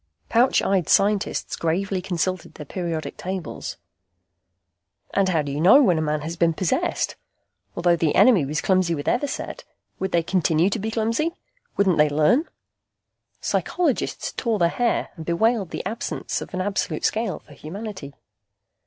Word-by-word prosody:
Pouch 245 +3 +3
eyed 190 -4 +1
scientists 205 0 +2
gravely 185 +3 -1
consulted 185 0 -2
their 150 - -8
periodic 170 0 -4
tables. 185 -3 -5 1.4
And 195 -1 +2
how 160 -4 +1
do 145 - -4
you 145 +2 -2
know 220 - +7
when 180 -8 +3
a - - 0
man 150 -1 -1
has 160 +3 -5
been 170 -1 +2
possessed? 180 -1 0 0.6
Although 175 0 +3
the 160 -2 +1
enemy 205 - +6
was 150 +3 -2
clumsy 185 -3 +2
with 145 - -5
Everset, 275 +3 -2 0.4
would 190 0 -2
they 170 -1 +2
continue 170 0 +2
to - - -1
be 220 +2 -2
clumsy? 230 +10 0 0.4
Wouldn't 190 -5 +3
they 150 0 +5
learn? 155 - +3 1.0
Psychologists 335 -7 -1
tore 230 -3 0
their 170 -3 +3
hair 240 +5 0
and 165 - -8
bewailed 200 +4 +1
the - - -5
absence 220 +4 -3
of - - -8
an 185 - -1
absolute 190 -5 -1
scale 220 -4 0
for 150 - -16
humanity. 165 -2 -8
185 Hz, 155 wpm, -23 LUFS, 160-210 Hz, 1.4 s, know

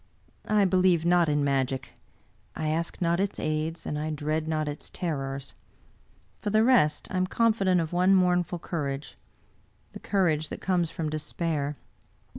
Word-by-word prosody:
I 210 -1 +4
believe 185 -3 +3
not 175 -2 +4
in 145 -1 +1
magic; 135 -1 -1 0.6
I 155 - -2
ask 165 +3 -2
not 170 +1 +2
its 200 +1 -1
aids, 155 +2 -2
and 150 - -3
I 155 +1 -2
dread 155 +1 -2
not 155 -1 -1
its 145 0 -5
terrors. 135 -5 -4 0.9
For 210 - -3
the 215 +1 +4
rest, 230 -12 +3
I 185 - -1
am 185 0 +1
confident 200 -4 +2
of 165 0 -3
one 185 +2 +4
mournful 180 -1 +2
courage 145 -4 -4 0.4
— - - -37
^the - - -8
courage 160 -6 +1
that - - -6
comes 180 -3 0
from 160 -2 -4
despair. 155 -1 -2
165 Hz, 160 wpm, -27 LUFS, 150-185 Hz, 0.9 s, I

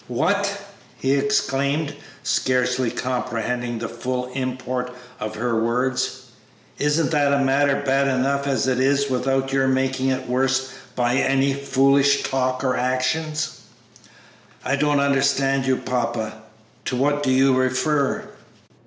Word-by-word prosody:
"What!" 200 +10 0 0.4
he 135 +1 +1
exclaimed, 140 +1 0 0.3
scarcely 125 -2 +1
comprehending 125 -1 -2
the 115 0 -4
full 125 +2 -4
import 130 -1 -3 0.3
of 110 0 -4
her 115 0 0
words; 125 +2 -1 0.6
"isn't 150 +2 +1
the 145 -2 +3
matter 140 +1 +2
bad 135 0 +2
enough 135 +2 0
as 135 -2 +1
it 130 -1 +1
is 140 +1 +2
without 135 +1 0
your 135 -1 +2
making 130 0 0
it 130 0 -2
worse 130 +1 0 0.2
by 120 +1 +1
any 135 0 +2
foolish 140 0 +3
talk 130 -1 -1
or 130 -1 +1
actions?" 155 +5 -1 1.1
"I - - +1
don't 145 0 +2
understand 135 -1 +2
you, 130 - +3
papa; 115 -3 -2 0.5
to 130 - -2
what 145 +3 +1
do 140 - 0
you 130 +1 +4
refer?" 130 +3 +1
135 Hz, 125 wpm, -22 LUFS, 125-140 Hz, 1.1 s, you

